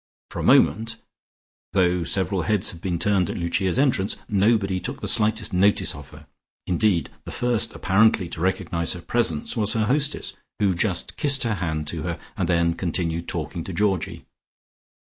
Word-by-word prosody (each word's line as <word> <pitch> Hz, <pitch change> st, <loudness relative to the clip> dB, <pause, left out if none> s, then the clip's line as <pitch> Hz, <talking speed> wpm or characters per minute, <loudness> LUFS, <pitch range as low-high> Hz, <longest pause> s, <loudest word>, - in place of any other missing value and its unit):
For -, -, -6 dB
a -, -, -3 dB
moment, 115 Hz, +2 st, +3 dB, 0.7 s
though 90 Hz, -2 st, +2 dB
several 95 Hz, +2 st, +1 dB
heads 105 Hz, +2 st, +2 dB
had 85 Hz, -, -11 dB
been 90 Hz, -2 st, -2 dB
turned 95 Hz, -1 st, +1 dB
at -, -, -4 dB
Lucia's 90 Hz, +3 st, -1 dB
entrance, 120 Hz, -8 st, +1 dB
nobody 100 Hz, -2 st, +1 dB
took 90 Hz, -, -4 dB
the -, -, -4 dB
slightest 110 Hz, -2 st, +2 dB
notice 100 Hz, +3 st, +3 dB
of -, -, -11 dB
her, -, -, -14 dB, 0.4 s
indeed, 90 Hz, -3 st, +1 dB
the -, -, -7 dB
first 115 Hz, -2 st, -1 dB
apparently 100 Hz, -1 st, +3 dB
to 80 Hz, -, -7 dB
recognize 90 Hz, -2 st, +1 dB
her 90 Hz, -, -8 dB
presence 85 Hz, -9 st, 0 dB
was 105 Hz, -1 st, +1 dB
her 110 Hz, -2 st, +1 dB
hostess, 145 Hz, +5 st, +1 dB, 0.2 s
who 100 Hz, -2 st, +2 dB
just 85 Hz, 0 st, -1 dB
kissed 140 Hz, -2 st, +3 dB
her 115 Hz, -2 st, 0 dB
hand 80 Hz, -5 st, -3 dB
to 80 Hz, -1 st, -4 dB
her, 85 Hz, +1 st, -4 dB, 0.2 s
and 90 Hz, -4 st, -2 dB
then 85 Hz, -1 st, +2 dB
continued 85 Hz, -1 st, -2 dB
talking 85 Hz, -, -4 dB
to 95 Hz, -, -7 dB
Georgie. 95 Hz, -1 st, -1 dB
95 Hz, 170 wpm, -23 LUFS, 85-110 Hz, 0.7 s, moment